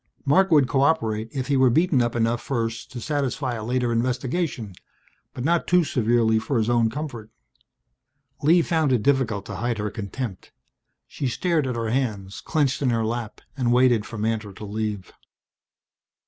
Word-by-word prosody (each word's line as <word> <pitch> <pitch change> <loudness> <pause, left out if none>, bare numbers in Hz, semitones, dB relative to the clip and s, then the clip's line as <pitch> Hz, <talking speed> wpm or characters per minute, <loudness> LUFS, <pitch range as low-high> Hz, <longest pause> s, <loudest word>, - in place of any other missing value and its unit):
Marc 190 +7 +4
would 145 -6 +5
cooperate 130 -6 +1
if 130 -2 -3
he 140 - 0
were 130 -1 +5
beaten 155 +1 +3
up 120 0 -1
enough 115 0 +1
first 115 -3 -3
to 125 - -6
satisfy 135 -1 -2
a 110 -2 -5
later 125 +1 0
investigation 125 - -1 0.6
but 125 - -6
not 170 +4 +1
too 180 0 +4
severely 115 -4 +2
for 125 +3 -2
his 110 +1 +1
own 115 -2 +3
comfort! 120 -5 -6 1.1
Lee 165 +4 +5
found 160 -5 +1
it 120 -5 +2
difficult 125 -8 +1
to 105 - -6
hide 120 +2 -1
her 105 -1 -3
contempt. 105 -1 -6 0.5
She 140 - -4
stared 155 +3 0
at 125 - -2
her 115 -1 -2
hands, 105 -7 -2
clenched 145 -4 0
in 135 - +2
her 115 -2 +1
lap, 115 -1 -4
and 125 -4 0
waited 120 -3 +3
for 115 - -8
Mantor 110 -1 -2
to 105 - -9
leave. 105 -2 -4
120 Hz, 170 wpm, -24 LUFS, 110-140 Hz, 1.1 s, would